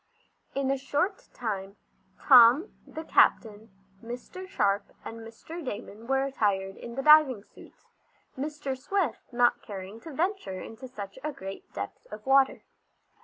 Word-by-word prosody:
In 270 -1 +1
a 275 - 0
short 295 +9 -1
time 200 -4 -4 0.4
Tom, 255 - +7
the 315 - -7
captain, 220 -7 +2 0.3
Mr. 250 +11 -8
Sharp 205 - +1 0.2
and 230 - -7
Mr. 230 +10 -9
Damon 225 -2 -7
were 270 0 +2
attired 200 -8 0
in 235 0 -9
the 270 - -3
diving 300 -8 +6
suits, - - -18 0.5
Mr. 290 -1 -4
Swift 315 - -2
not 240 0 +3
caring 195 +1 -8
to 320 - -10
venture 325 - -2
into 225 +7 -9
such 205 -3 -8
a 305 - -2
great 195 -8 -9
depth 100 0 -6
of 210 0 -9
water. 270 0 +4
250 Hz, 140 wpm, -28 LUFS, 210-285 Hz, 0.5 s, Tom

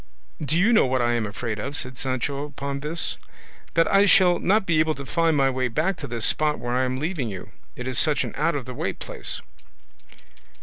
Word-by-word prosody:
"Do 150 +3 0
you 205 +7 +4
know 215 - +5
what 130 -1 +1
I 120 0 +2
am 115 -3 0
afraid 110 +1 -4
of?" 140 +6 -4
said 130 0 -6
Sancho 135 +2 -2
upon 140 -1 -5
this; 155 +4 -2 0.6
"that 165 0 +4
I 200 +1 +6
shall 180 -2 +5
not 205 +1 +2
be 170 -3 +2
able 155 0 +2
to 140 - -7
find 165 0 +2
my 135 -1 +4
way 130 0 0
back 155 +11 0
to - - -6
this 115 -1 -2
spot 150 -1 +2
where 120 0 -3
I 130 +1 +2
am 130 0 -2
leaving 150 -4 -2
you, 95 -3 -8 0.2
it 125 - -6
is 130 -2 0
such 150 -3 +2
an - - -5
out 155 +2 +1
of 135 -4 -3
the 130 - -7
way - - -2
place." - - -5
140 Hz, 225 wpm, -24 LUFS, 125-165 Hz, 0.6 s, I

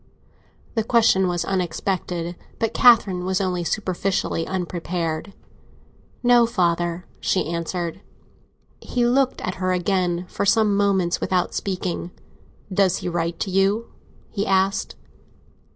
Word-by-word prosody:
The 225 - 0
question 220 -5 +4
was 175 -1 -1
unexpected, 180 -1 -2 0.2
but 225 -2 -1
Catherine 205 -7 +5
was 185 0 0
only 180 -3 -1
superficially 185 -3 -1
unprepared. 175 -1 -3 0.9
"No, 240 -1 +5
father!" 175 -3 0
she 190 - +1
answered. 170 +1 -3 0.8
He 245 -1 -1
looked 260 +2 +2
at 185 +1 -4
her 185 0 +1
again 180 -1 0
for - - -3
some 210 0 +3
moments, 195 -3 +1
without 180 -1 0
speaking. 180 -3 -3 0.6
"Does 185 -1 +3
he - - 0
write 170 0 -2
to 195 - -2
you?" 195 +4 +1 0.4
he 205 0 -2
asked. 195 +1 +1
185 Hz, 120 wpm, -23 LUFS, 175-200 Hz, 0.9 s, Catherine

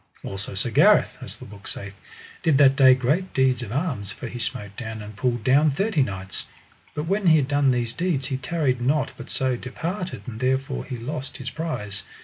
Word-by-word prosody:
Also 95 0 -5
Sir 115 +5 -1
Gareth, - - +5
as - - -7
the - - -11
book 100 -1 -11
saith, 100 0 -6 0.5
did 155 -4 +3
that 135 -1 +6
day 130 -2 +7
great 145 +9 0
deeds 130 -1 +3
of 115 -4 -6
arms, 130 - -2
for 95 - -8
he 120 +1 -6
smote 105 -5 -4
down 110 0 -5
and 105 0 -9
pulled 120 -1 0
down 140 +6 +5
thirty 190 +2 +1
knights. 95 -6 -3 0.5
But 150 - -1
when 195 +2 +1
he 160 -1 +7
had 140 -3 +1
done 145 -1 +3
these 120 -2 0
deeds 165 -7 0
he 135 - -1
tarried 135 -3 0
not 140 +3 +1
but 120 - -10
so 130 -1 0
departed, 170 - -4
and 110 -3 -7
therefore 130 +1 0
he 125 - -5
lost 135 +4 -5
his 130 0 -5
prize. 105 -11 -4
130 Hz, 205 wpm, -24 LUFS, 115-150 Hz, 0.5 s, day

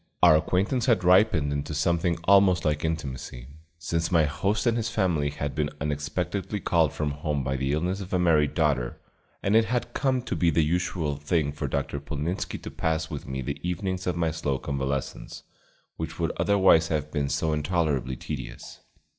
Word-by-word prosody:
Our 85 -3 +8
acquaintance 95 - +1
had 115 -7 +3
ripened 90 -5 +4
into 70 +1 -3
something 85 +2 +1
almost 95 -1 +5
like 75 -1 0
intimacy, 65 -6 -4 0.3
since 85 +1 -2
my 85 -3 +5
host 100 - -1
and 115 -1 +3
his 115 -1 -1
family 90 -10 +1
had 70 -1 -4
been 75 -1 -1
unexpectedly 75 +8 -2
called 85 -5 +2
from 75 -1 -2
home 75 -1 -2
by 65 +1 -1
the 70 +1 -1
illness 90 +6 -1
of 95 - -8
a 90 - +2
married 80 -4 +3
daughter, 70 -7 0 0.4
and 100 +2 +2
it 115 0 +5
had 120 +2 -2
come 130 -3 0
to - - -3
be 85 - +2
the 80 0 +3
usual 85 -3 -1
thing 75 0 0
for - - -4
Dr. 70 - -2
Polnitzski 75 +5 -3
to - - -6
pass 80 0 -1
with 75 - -6
me 65 0 -4
the 70 +3 -4
evenings 90 +1 -3
of 90 -2 0
my 85 -2 +1
slow 70 -3 -1
convalescence, 70 -1 -4 0.5
which 80 0 -5
would 85 -1 0
otherwise 95 -5 +4
have 75 -1 -2
been 70 -3 -1
so 80 +2 0
intolerably 75 -5 0
tedious. - - -7
80 Hz, 180 wpm, -26 LUFS, 75-90 Hz, 0.5 s, Our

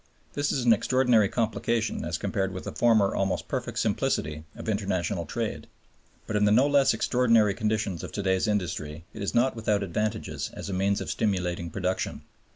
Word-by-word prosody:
This 145 0 0
is 130 -3 -1
an 115 - +7
extraordinary 120 -2 +3
complication 115 0 -1
as - - -2
compared 95 -1 -1
with 95 0 -6
the - - -5
former 110 -4 +3
almost 95 -1 -1
perfect - - -3
simplicity 75 +1 -1
of - - -9
international 100 -5 -1
trade. - - -3 0.6
But 110 - -4
in 105 0 +3
the 105 - +4
no 125 +6 +5
less 140 -2 +4
extraordinary 115 -4 +3
conditions 105 -4 -1
of - - -6
to 100 - -3
day's 95 +2 +1
industry 85 -6 -2
it 110 - -8
is 100 - -2
not 125 +2 +3
without 105 -3 0
advantages 105 +3 -2
as 100 - -6
a - - -3
means 100 +2 +1
of - - -3
stimulating 90 -5 -1
production. 90 +2 -2
105 Hz, 180 wpm, -27 LUFS, 95-115 Hz, 0.6 s, an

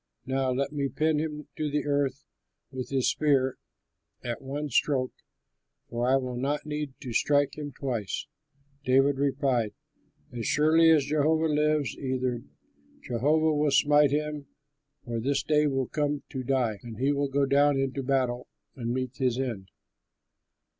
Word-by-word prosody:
Now 135 0 0
let 135 +2 -1
me 140 -2 -1
pin 155 +1 +1
him 150 -1 -4
to 155 -1 -1
the 150 0 -1
earth 140 -1 0 0.5
with 130 -1 -5
his 135 -2 +1
spear 135 -4 +1 0.6
at 120 -1 -4
one 145 +2 -4
stroke, 130 0 +1 0.8
for 120 +1 0
I 135 - +5
will 130 -2 -2
not 145 +4 -1
need 150 -3 -4
to 125 -4 -6
strike 145 +3 +2
him 145 -1 -6
twice!" 120 -8 -3 0.6
David 135 +1 +3
replied, 130 -6 0 0.6
"As 120 0 -3
surely 155 +3 +4
as 155 -4 +5
Jehovah 155 +2 +2
lives, 150 -4 +1
either 130 -2 -1 0.6
Jehovah 150 +6 +2
will 150 0 +2
smite 145 +1 +5
him, 150 0 -2 0.6
or 120 -2 -3
his 140 +4 0
day 150 -1 +3
will 135 -3 0
come 145 -1 -1
to 130 - -4
die, 125 -5 0
or 115 -3 -8
he 135 +4 +2
will 140 -1 0
go 140 +1 +2
down 140 +1 +3
into 135 0 -1
battle 130 -2 0 0.3
and 120 -3 -3
meet 130 0 -3
his 125 -2 +1
end. 115 -8 -3
140 Hz, 155 wpm, -28 LUFS, 130-150 Hz, 0.8 s, I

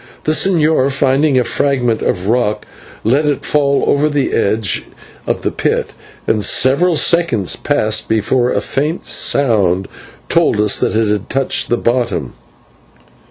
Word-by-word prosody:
The 155 - 0
señor, 155 -5 +2
finding 135 +1 +1
a 125 - +3
fragment 125 -4 0
of 90 +1 -2
rock, 115 -2 0 0.4
let 135 +7 +1
it 145 -2 -2
fall 140 -2 +1
over 150 +2 +1
the 145 -2 -1
edge 105 0 0 0.4
of - - -2
the - - -1
pit, - - -2 0.3
and 105 -2 0
several 150 - +2
seconds 150 - +1
passed 110 -7 -1
before 120 +3 +1
a - - -1
faint 150 +5 -3
sound 100 -8 +1 0.4
told - - +1
us 105 -1 +2
that - - -1
it 110 0 +1
had 105 +2 -2
touched 135 0 0
the 120 - +1
bottom. 115 - -2
130 Hz, 145 wpm, -15 LUFS, 110-145 Hz, 0.4 s, a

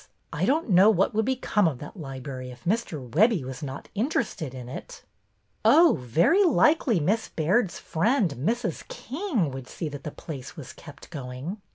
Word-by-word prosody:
I 160 +5 0
don't 300 +8 +1
know 190 +4 +7
what 195 -1 +2
would 220 0 +1
become 240 -6 +1
of 145 -6 -2
that 145 - -10
library 135 -5 -7
if 125 -1 -12
Mr. 170 - -1
Webbie 195 - +3
was 130 +2 -7
not 135 -2 -6
interested 210 - -1
in 125 -2 -8
it." - - -9 0.3
'' - - -45 0.2
Oh, 335 0 +6
very 170 - +3
likely 305 - +3
Miss 205 +9 0
Baird's 180 +5 +1
friend, 200 - +1
Mrs. 230 - -2
King, 260 - -2
would 130 -1 -7
see 160 - -5
that 145 -1 -8
the - - -4
place 140 0 -9
was 145 -5 -9
kept 145 +1 -13
going. 140 +7 -6
170 Hz, 175 wpm, -26 LUFS, 135-230 Hz, 0.3 s, know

